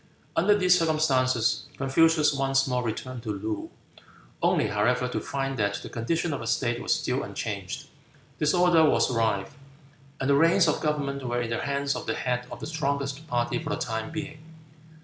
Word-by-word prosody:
Under 205 +5 +4
these 180 -2 +4
circumstances 130 -7 +1
Confucius 150 +2 +3
once 135 -1 +2
more 125 -1 0
returned 120 +2 -4
to 110 - -7
Loo, 105 +1 -4 0.7
only - - +3
however 120 +5 +1
to 125 - -3
find 135 -2 -3
that 100 -1 +1
the - - -7
condition 160 +7 -1
of 140 - -3
the 115 - -6
state 120 +1 0
was - - +2
still - - -1
unchanged; - - -5 0.5
disorder 170 +1 +4
was 150 - +3
rife; 110 0 0 0.6
and 135 - -1
the 140 - +4
reins 165 +4 +5
of - - +1
government 145 -2 -1
were 120 -1 -1
in 115 -1 -3
the 115 - -1
hands 140 0 -1
of - - -6
the - - 0
head 125 -1 -2
of - - -7
the - - -4
strongest 140 -1 -2
party 120 +6 -1
for 150 - -5
the 145 - 0
time 110 0 -3
being. 155 -1 -6
135 Hz, 180 wpm, -27 LUFS, 120-155 Hz, 0.7 s, reins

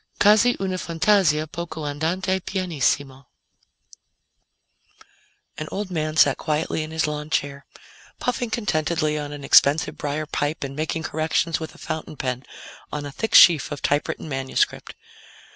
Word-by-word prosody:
QUASI 215 +4 +5
UNA 190 -1 -2
FANTASIA 165 -3 +2
POCO 160 -1 -6
ANDANTE 175 +6 -1
PIANISSIMO 140 -7 -1 2.3
An 155 - -5
old 200 -1 -4
man 155 -2 -2
sat 140 -3 +5
quietly 155 0 -1
in 155 - -5
his 160 0 0
lawnchair, 150 -2 -3 0.5
puffing 245 -1 -2
contentedly 155 -8 0
on 145 -1 -5
an 145 -1 -8
expensive 150 +2 +4
briar 150 +1 -2
pipe 145 0 -2
and 135 0 -6
making 160 +2 -2
corrections 160 +1 0
with 160 - -7
a - - -15
fountain 155 -1 -6
pen 125 -1 -3 0.5
on 150 -1 -4
a 145 - -6
thick 225 +10 -2
sheaf 165 -6 +7
of 145 -2 -6
typewritten 145 +2 -1
manuscript. 135 -2 -2
155 Hz, 135 wpm, -23 LUFS, 145-170 Hz, 2.3 s, sheaf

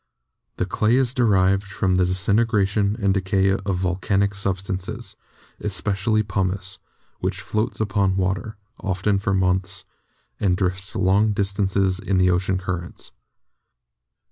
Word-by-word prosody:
The - - 0
clay 105 +5 +1
is 130 -2 +2
derived 95 -6 +3
from 95 -1 0
the 90 - +3
disin 95 +5 +2
tegration 100 -1 +1
and 100 -4 +2
decay 95 0 +1
of 95 0 -1
volcanic 95 +2 0
substances, 95 +3 -3 0.4
especially 105 +2 0
pumice, 95 -1 -3 0.4
which - - -2
floats 110 +1 -2
upon 100 -3 +1
water, 95 +3 -2 0.2
often 100 +1 0
for 100 -1 0
months, 95 0 0 0.5
and 90 -3 +2
drifts 95 0 -2
long 100 +3 +3
distances 100 -2 0
in 100 -3 -1
the 90 0 +4
ocean 95 +1 +1
currents. 90 -1 -5
95 Hz, 125 wpm, -23 LUFS, 95-105 Hz, 0.5 s, the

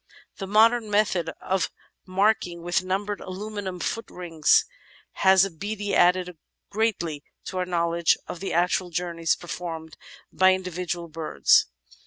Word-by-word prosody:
The 195 - -5
modern 220 +2 +4
method 200 -5 +1
of 185 -3 -1 0.4
marking 185 -3 +1
with 175 +1 0
numbered 200 +2 -2
aluminium 195 -1 -6
foot 230 +5 -3
rings 165 -4 +2 0.5
has 190 0 +5
abeady 205 +3 -4
added 180 -2 +3 0.3
greatly 195 -9 -1 0.2
to 185 - -4
our 180 - -1
knowledge 170 -1 +2
of 175 - -7
the 195 - -4
actual 180 +1 +1
journeys 170 -1 -1
performed 165 -2 -7 0.4
by 185 0 +5
individual 180 -2 -4
birds. 155 - +3
180 Hz, 125 wpm, -25 LUFS, 170-195 Hz, 0.5 s, has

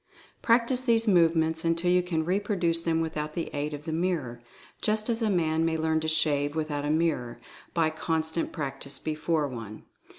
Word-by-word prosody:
Practice 240 +2 +3
these 230 -3 +2
movements 165 -3 +3
until 165 +1 +1
you 180 0 +4
can 165 -3 -2
reproduce 180 -3 +1
them 165 -1 +1
without 155 -2 -3
the 170 - -3
aid 145 +1 -2
of 145 +1 -11
the 160 - -3
mirror, 160 -9 -2 0.4
just 215 +2 0
as 230 +1 -2
a 220 - +2
man 160 -4 +1
may 165 -1 +1
learn 160 0 +1
to 160 - -3
shave 150 -2 +1
without 155 -2 -2
a - - -1
mirror, 150 -7 0 0.4
by 160 -2 +2
constant 160 +1 -2
practice 140 -1 -4
before 155 0 -1
one. 115 -5 -8
160 Hz, 175 wpm, -27 LUFS, 150-175 Hz, 0.4 s, you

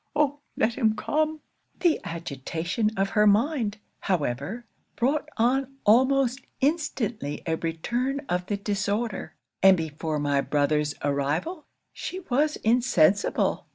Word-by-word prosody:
Oh! 290 -1 +1 0.2
let 230 - +2
him 220 -3 +3
come!" 310 +3 -1 0.4
'The 345 -3 +3
agitation 165 - -2
of 195 0 +1
her 210 +1 +4
mind, 220 0 +2 0.2
however, 175 - -2 0.3
brought 295 +5 0
on 270 +3 +1
almost 260 +3 +4 0.2
instantly 255 - -1
a 165 - 0
return 240 - -2
of 180 +1 -1
the 205 - -1
disorder; 205 +1 -2 0.3
and 190 0 +7
before 160 -1 -3
my 145 -1 +1
brother's 150 +1 +1
arrival, 145 - -1 0.3
she 370 +1 -5
was 295 +4 +2
insensible. 220 -6 +2
210 Hz, 120 wpm, -26 LUFS, 165-270 Hz, 0.4 s, and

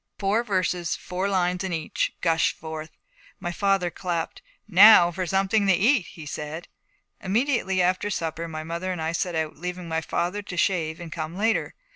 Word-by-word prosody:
Four 205 +4 +1
verses, 180 -5 -1
four 185 +2 -3
lines 180 -1 0
in 190 - -3
each, 160 -2 -1
gushed 165 -2 +2
forth. 160 0 -7 0.5
My 175 - -3
father 195 -1 +1
clapped. 170 -3 -3 0.3
'Now 195 -2 +8
for 180 +1 -3
something 195 +3 +2
to 190 - +5
eat,' 215 +3 +3
he 160 - -11
said. 150 +3 -6 0.5
Immediately 200 -2 +1
after 185 +3 +1
supper 165 -3 -3
my 155 -1 -6
mother 170 +3 -3
and 180 - -4
I 160 0 -1
set 170 +1 -2
out, 160 -2 -2
leaving 180 +1 -5
my 160 0 -1
father 175 +5 -2
to 195 -3 -8
shave 165 -3 0
and 170 -2 -8
come 160 +1 -5
later. 220 +2 0
180 Hz, 175 wpm, -25 LUFS, 165-195 Hz, 0.5 s, Now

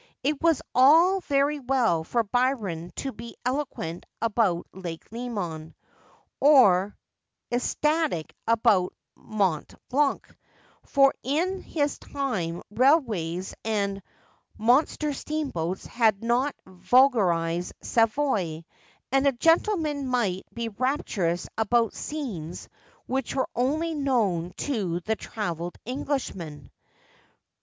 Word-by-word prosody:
It 290 +1 0
was 330 -3 +3
all 325 +9 +6
very 285 -1 +1
well 245 - +1
for 235 +8 0
Byron 210 -8 -1
to 270 - -3
be 230 +1 -10
eloquent 250 - -3
about 215 -6 +1
Lake 175 -3 -7
Leman 195 -10 -5 0.6
or 210 -10 +5 0.5
ecstatic 300 - 0
about 225 -5 +3 0.2
Mont 195 -8 -1
Blanc; 280 +2 +1 0.5
for 275 0 +4
in 350 +8 -1
his 290 -3 -2
time 185 -12 -3
railways 210 - +2
and 200 -3 -1 0.6
mon 245 +7 +4
ster 300 -1 -3
steamboats 265 - -3
had 220 -3 +1
not 245 +5 +1
vulgarised 180 -5 +2
Savoy, 215 - +1 0.5
and 270 +1 +3
a - - +5
gentleman 320 - +2
might 220 -8 0
be 235 -1 -4
rapturous 200 - -1
about 230 0 +2
scenes 205 - -5 0.4
which 265 -1 -2
were 265 - 0
only 310 +7 0
known 215 - 0
to 195 -11 -1
the 220 +5 -1
travelled 175 -7 -5
Englishman. 195 - -4
235 Hz, 100 wpm, -26 LUFS, 180-275 Hz, 0.6 s, all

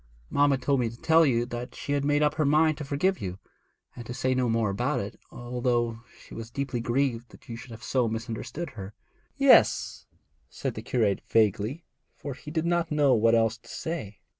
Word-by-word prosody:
Mamma 145 -1 +3
told 135 +1 +1
me 120 -2 +1
to 115 +1 -12
tell 160 0 +5
you 120 -2 +2
that 120 0 -6
she - - -5
had 145 -1 +1
made 145 +1 +2
up 150 - +2
her 155 - 0
mind 155 +2 +3
to - - -4
forgive 150 +7 0
you, 90 -1 -4 0.6
and 120 - -7
to 120 - -5
say 130 0 0
no 125 -2 +1
more 115 -3 +1
about 125 +7 -1
it, 100 +1 -6
although 120 -1 -1 0.2
she - - -14
was 115 0 -7
deeply 135 -1 -3
grieved 120 0 -1
that - - -18
you 115 - -6
should 125 +2 -10
have 115 +1 -10
so 125 -3 +1
misunderstood 115 +7 -5
her.' 100 -1 -9 0.4
'Yes,' - - +4 0.4
said - - -4
the - - -6
curate 110 -6 0
vaguely, 110 - +1 0.3
for 140 - -6
he 130 +3 -11
did 160 +1 -1
not 170 -1 +1
know 145 -3 +4
what 115 +1 +4
else 115 0 +2
to 115 0 -18
say. 140 - -5
125 Hz, 205 wpm, -27 LUFS, 115-145 Hz, 0.6 s, tell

